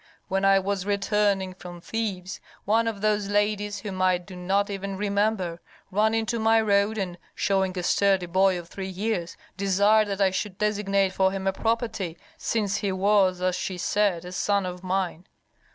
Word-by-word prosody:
When 195 Hz, 0 st, 0 dB
I 195 Hz, 0 st, +6 dB
was 195 Hz, 0 st, -1 dB
returning 200 Hz, -2 st, +1 dB
from 175 Hz, -1 st, -10 dB
Thebes 195 Hz, -2 st, -4 dB, 0.3 s
one 225 Hz, +3 st, +2 dB
of 215 Hz, -3 st, -3 dB
those 210 Hz, -1 st, +1 dB
ladies, 205 Hz, 0 st, 0 dB
whom 190 Hz, -3 st, -5 dB
I 185 Hz, -1 st, +4 dB
do 180 Hz, +1 st, -12 dB
not 195 Hz, +3 st, 0 dB
even 195 Hz, 0 st, -4 dB
remember, 200 Hz, -4 st, 0 dB, 0.3 s
ran 215 Hz, +3 st, +2 dB
into 225 Hz, +1 st, -1 dB
my 225 Hz, +1 st, +4 dB
road 205 Hz, 0 st, +2 dB
and, 180 Hz, -3 st, -3 dB, 0.2 s
showing 190 Hz, -1 st, 0 dB
a 180 Hz, -, -2 dB
sturdy 195 Hz, 0 st, +2 dB
boy 185 Hz, +1 st, +3 dB
of 175 Hz, -1 st, -8 dB
three 190 Hz, +2 st, -6 dB
years, 190 Hz, -2 st, -3 dB, 0.2 s
desired 200 Hz, +2 st, +3 dB
that 200 Hz, -1 st, -3 dB
I 195 Hz, -1 st, +3 dB
should 190 Hz, 0 st, -3 dB
designate 200 Hz, -2 st, +1 dB
for 190 Hz, 0 st, +2 dB
him 195 Hz, 0 st, -4 dB
a 195 Hz, -, +1 dB
property, 220 Hz, -6 st, -2 dB, 0.2 s
since 205 Hz, -3 st, -1 dB
he 200 Hz, -, -1 dB
was, 190 Hz, -1 st, +2 dB
as 185 Hz, 0 st, +2 dB
she 185 Hz, -1 st, -3 dB
said, 185 Hz, -2 st, 0 dB
a 180 Hz, -, -7 dB
son 200 Hz, +1 st, 0 dB
of 180 Hz, 0 st, -6 dB
mine. 185 Hz, -1 st, -2 dB
195 Hz, 180 wpm, -26 LUFS, 185-210 Hz, 0.3 s, I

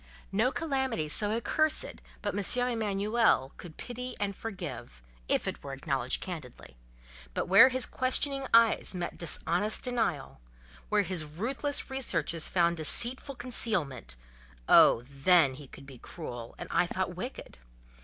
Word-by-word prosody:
No 225 Hz, +6 st, +1 dB
calamity 265 Hz, -, -2 dB
so 205 Hz, +7 st, +1 dB
accursed 305 Hz, +7 st, +1 dB, 0.2 s
but 205 Hz, -, -2 dB
M. 245 Hz, +5 st, +2 dB
Emanuel 210 Hz, -, +1 dB
could 165 Hz, -3 st, -11 dB
pity 250 Hz, 0 st, -6 dB
and 200 Hz, -1 st, -2 dB
forgive, 170 Hz, -, -8 dB, 0.3 s
if -, -, +1 dB
it -, -, -5 dB
were 140 Hz, -, -7 dB
acknowledged 135 Hz, -2 st, -1 dB
candidly; 150 Hz, -, -9 dB, 0.6 s
but -, -, -1 dB
where 195 Hz, +8 st, +8 dB
his 260 Hz, 0 st, 0 dB
questioning 270 Hz, +1 st, +1 dB
eyes 230 Hz, -4 st, +4 dB
met 175 Hz, -1 st, -5 dB
dishonest 175 Hz, +5 st, +1 dB
denial—where 135 Hz, -, -3 dB
his 180 Hz, -3 st, -1 dB
ruthless 255 Hz, -, -3 dB
researches 170 Hz, -, -1 dB
found 170 Hz, -1 st, +1 dB
deceitful 245 Hz, -, +2 dB
concealment—oh, 65 Hz, -, +1 dB
then, 140 Hz, +2 st, +3 dB
he 140 Hz, +1 st, -11 dB
could 135 Hz, -, -14 dB
be 135 Hz, -3 st, -13 dB
cruel, 120 Hz, -8 st, -8 dB
and -, -, -7 dB
I -, -, +2 dB
thought -, -, -3 dB
wicked! -, -, -8 dB
185 Hz, 130 wpm, -29 LUFS, -, 0.6 s, where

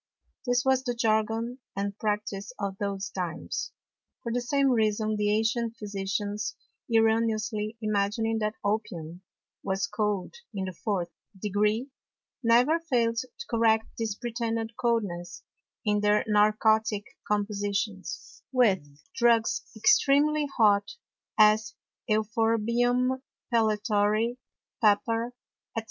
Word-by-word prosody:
This 245 Hz, +1 st, +2 dB
was 265 Hz, -1 st, +3 dB
the 245 Hz, -2 st, -2 dB
Jargon 225 Hz, +1 st, 0 dB, 0.2 s
and 200 Hz, 0 st, -2 dB
Practice 210 Hz, -1 st, -2 dB
of 200 Hz, -2 st, -2 dB
those 200 Hz, -1 st, -3 dB
Times. 175 Hz, -3 st, -4 dB, 0.5 s
For 235 Hz, -, -3 dB
the 245 Hz, +1 st, 0 dB
same 275 Hz, +2 st, +2 dB
Reason 215 Hz, -2 st, +1 dB
the 210 Hz, 0 st, +1 dB
ancient 230 Hz, +2 st, 0 dB
Physicians 205 Hz, 0 st, -3 dB, 0.4 s
erroneously 220 Hz, -1 st, +1 dB
imagining 215 Hz, +2 st, 0 dB
that 215 Hz, 0 st, -1 dB
Opium 180 Hz, -5 st, -3 dB, 0.4 s
was 195 Hz, 0 st, -1 dB
cold 210 Hz, -4 st, -2 dB, 0.2 s
in 190 Hz, -1 st, -2 dB
the 185 Hz, -, -5 dB
fourth 180 Hz, -2 st, -2 dB, 0.3 s
Degree, 210 Hz, +6 st, 0 dB, 0.5 s
never 250 Hz, +7 st, +4 dB
fail'd 235 Hz, -8 st, +1 dB
to 255 Hz, -, -8 dB
correct 225 Hz, -1 st, +3 dB
this 220 Hz, -3 st, -1 dB
pretended 230 Hz, -1 st, -3 dB
Coldness 210 Hz, -9 st, -2 dB, 0.4 s
in 210 Hz, -1 st, +2 dB
their 210 Hz, 0 st, +3 dB
narcotick 215 Hz, 0 st, +3 dB, 0.2 s
Compositions, 205 Hz, -1 st, -2 dB
with 225 Hz, -, +3 dB, 0.3 s
Drugs 235 Hz, -2 st, +3 dB
extremely 290 Hz, +6 st, +4 dB
hot, 205 Hz, -3 st, +4 dB, 0.4 s
as 215 Hz, +2 st, +4 dB, 0.3 s
Euphorbium, 230 Hz, +4 st, +1 dB, 0.3 s
Pellitory, 215 Hz, +1 st, +2 dB, 0.4 s
Pepper, 230 Hz, +3 st, +2 dB, 0.4 s
&c. -, -, +4 dB
220 Hz, 105 wpm, -28 LUFS, 205-235 Hz, 0.5 s, never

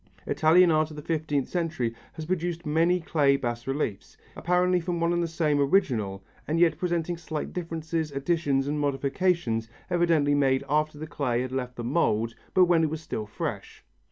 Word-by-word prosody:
Italian 170 Hz, +3 st, +4 dB
art 155 Hz, 0 st, +2 dB
of 155 Hz, -, -10 dB
the 150 Hz, -, -8 dB
fifteenth 150 Hz, -4 st, -1 dB
century 160 Hz, -10 st, -2 dB, 0.2 s
has 160 Hz, -1 st, -7 dB
produced 175 Hz, 0 st, -2 dB
many 165 Hz, +4 st, +2 dB
clay 145 Hz, -5 st, +2 dB
bas 120 Hz, -2 st, -4 dB
reliefs, 135 Hz, -7 st, -3 dB, 0.2 s
apparently 180 Hz, +1 st, +2 dB
from 175 Hz, 0 st, -3 dB
one 170 Hz, +1 st, +1 dB
and 175 Hz, -, +1 dB
the 170 Hz, -, 0 dB
same 155 Hz, -3 st, 0 dB
original 120 Hz, -, +1 dB, 0.2 s
and 160 Hz, +2 st, 0 dB
yet 165 Hz, -3 st, +3 dB
presenting 175 Hz, -1 st, -1 dB
slight 160 Hz, -2 st, -5 dB
differences, 165 Hz, -2 st, -3 dB
additions 140 Hz, -1 st, 0 dB
and 150 Hz, +1 st, -1 dB
modifications 140 Hz, -4 st, 0 dB, 0.2 s
evidently 165 Hz, -5 st, +3 dB
made 135 Hz, -2 st, +2 dB
after 150 Hz, +1 st, 0 dB
the 155 Hz, -, -6 dB
clay 125 Hz, -5 st, -1 dB
had 130 Hz, -, -5 dB
left 125 Hz, -1 st, -3 dB
the 120 Hz, -, -5 dB
mould 115 Hz, -4 st, +1 dB, 0.2 s
but 185 Hz, -1 st, +7 dB
when 170 Hz, -2 st, +3 dB
it 155 Hz, -, +2 dB
was 160 Hz, +1 st, -4 dB
still 110 Hz, -8 st, -5 dB
fresh. -, -, -6 dB
155 Hz, 180 wpm, -27 LUFS, 135-170 Hz, 0.2 s, but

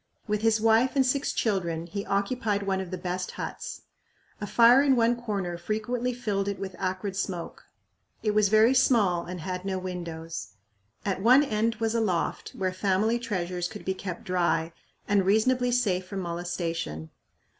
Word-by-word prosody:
With 210 Hz, 0 st, 0 dB
his 225 Hz, -1 st, +3 dB
wife 225 Hz, +5 st, +3 dB
and 270 Hz, -1 st, +4 dB
six 275 Hz, +2 st, +1 dB
children 170 Hz, -6 st, -1 dB
he 200 Hz, +4 st, -5 dB
occupied 200 Hz, 0 st, 0 dB
one 190 Hz, -1 st, 0 dB
of 185 Hz, -, -6 dB
the 185 Hz, -, -4 dB
best 180 Hz, 0 st, -3 dB
huts. -, -, -6 dB, 0.6 s
A 205 Hz, -, -3 dB
fire 240 Hz, +5 st, +6 dB
in 280 Hz, -2 st, +4 dB
one 235 Hz, 0 st, +3 dB
corner 200 Hz, -7 st, -3 dB
frequently 220 Hz, +6 st, -2 dB
filled 210 Hz, -5 st, -2 dB
it 200 Hz, -1 st, -2 dB
with 190 Hz, -2 st, -6 dB
acrid 190 Hz, +1 st, -2 dB
smoke. 180 Hz, -3 st, -4 dB, 0.6 s
It 215 Hz, -, +2 dB
was 210 Hz, -1 st, +3 dB
very 220 Hz, +4 st, +5 dB
small 215 Hz, -9 st, +3 dB
and 180 Hz, -1 st, -6 dB
had 180 Hz, +1 st, -4 dB
no 190 Hz, -1 st, -2 dB
windows. 170 Hz, -, -6 dB, 0.5 s
At 195 Hz, -2 st, -1 dB
one 255 Hz, +7 st, +6 dB
end 225 Hz, -3 st, 0 dB
was 225 Hz, -1 st, -1 dB
a 230 Hz, -, +1 dB
loft 185 Hz, -6 st, -1 dB
where 185 Hz, -1 st, -1 dB
family 205 Hz, +5 st, +1 dB
treasures 180 Hz, -6 st, -2 dB
could 210 Hz, +2 st, -10 dB
be 190 Hz, -, 0 dB
kept 185 Hz, -2 st, -6 dB
dry 170 Hz, -2 st, 0 dB, 0.3 s
and 200 Hz, -1 st, +3 dB
reasonably 245 Hz, +6 st, +3 dB
safe 195 Hz, -7 st, +1 dB
from 195 Hz, 0 st, -4 dB
molestation. 170 Hz, -, -4 dB
200 Hz, 170 wpm, -27 LUFS, 180-225 Hz, 0.6 s, fire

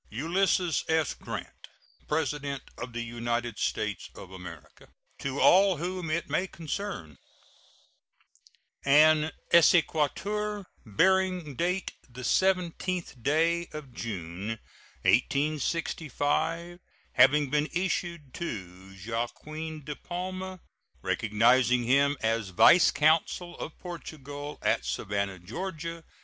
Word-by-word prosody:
ULYSSES 170 Hz, -, +1 dB
S. 160 Hz, -4 st, +2 dB
GRANT, -, -, -8 dB, 0.4 s
PRESIDENT 145 Hz, -3 st, -1 dB
OF 125 Hz, -, -6 dB
THE 120 Hz, 0 st, -4 dB
UNITED 120 Hz, -1 st, -3 dB
STATES -, -, -2 dB
OF 95 Hz, -, -11 dB
AMERICA. 90 Hz, -4 st, -11 dB, 0.3 s
To 140 Hz, 0 st, -3 dB
all 190 Hz, 0 st, +6 dB
whom 180 Hz, +1 st, -3 dB
it 170 Hz, +2 st, -1 dB
may 190 Hz, -, 0 dB
concern: 165 Hz, -, -5 dB, 1.6 s
An 155 Hz, +2 st, +5 dB, 0.2 s
exequatur, 190 Hz, +5 st, +3 dB, 0.2 s
bearing 180 Hz, -, +2 dB
date 180 Hz, +5 st, -1 dB, 0.2 s
the 125 Hz, +1 st, -9 dB
17th 180 Hz, -4 st, 0 dB
day 165 Hz, +6 st, +2 dB
of 145 Hz, -5 st, -8 dB
June, 100 Hz, -1 st, -5 dB, 0.5 s
1865, 155 Hz, -, 0 dB, 0.3 s
having 145 Hz, -1 st, +5 dB
been 150 Hz, +1 st, +1 dB
issued 170 Hz, -5 st, -2 dB
to 95 Hz, -, -7 dB
Joaquin 155 Hz, +7 st, -4 dB
de 150 Hz, +1 st, -5 dB
Palma, 185 Hz, +2 st, -5 dB, 0.4 s
recognizing 120 Hz, +3 st, +3 dB
him 140 Hz, +4 st, +3 dB
as 110 Hz, -2 st, 0 dB
vice 165 Hz, -, +7 dB
consul 165 Hz, +3 st, +2 dB
of 155 Hz, -, -6 dB
Portugal 145 Hz, -4 st, -7 dB
at -, -, +2 dB
Savannah, 100 Hz, -1 st, -2 dB
Ga. 165 Hz, -, -5 dB
150 Hz, 100 wpm, -28 LUFS, 120-175 Hz, 1.6 s, vice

